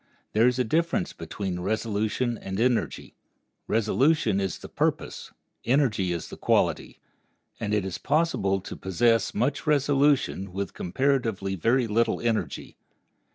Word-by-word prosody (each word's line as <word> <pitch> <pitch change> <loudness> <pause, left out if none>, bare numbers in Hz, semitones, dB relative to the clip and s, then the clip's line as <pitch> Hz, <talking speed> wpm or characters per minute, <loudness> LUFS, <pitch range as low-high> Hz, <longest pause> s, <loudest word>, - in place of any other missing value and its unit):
There 110 +3 +5
is 125 0 +1
a 125 - +2
difference 170 - 0
between 95 -3 -5
resolution 110 +4 -1
and 95 -2 -5
energy. 120 0 0 0.5
Resolution 115 0 +2
is 95 -3 -2
the - - -10
purpose, - - -2 0.3
energy 115 -8 +2
is 85 -2 -4
the - - -9
quality, - - 0 0.6
and 105 -2 -3
it 105 -2 +1
is 95 - -4
possible 145 - +1
to - - -7
possess 115 +5 +1
much 135 +8 -1
resolution 140 -9 +2
with 100 +1 -3
comparatively 115 -2 0
very 115 +7 +2
little 115 +1 +1
energy. 115 -2 -2
115 Hz, 130 wpm, -26 LUFS, 100-135 Hz, 0.6 s, There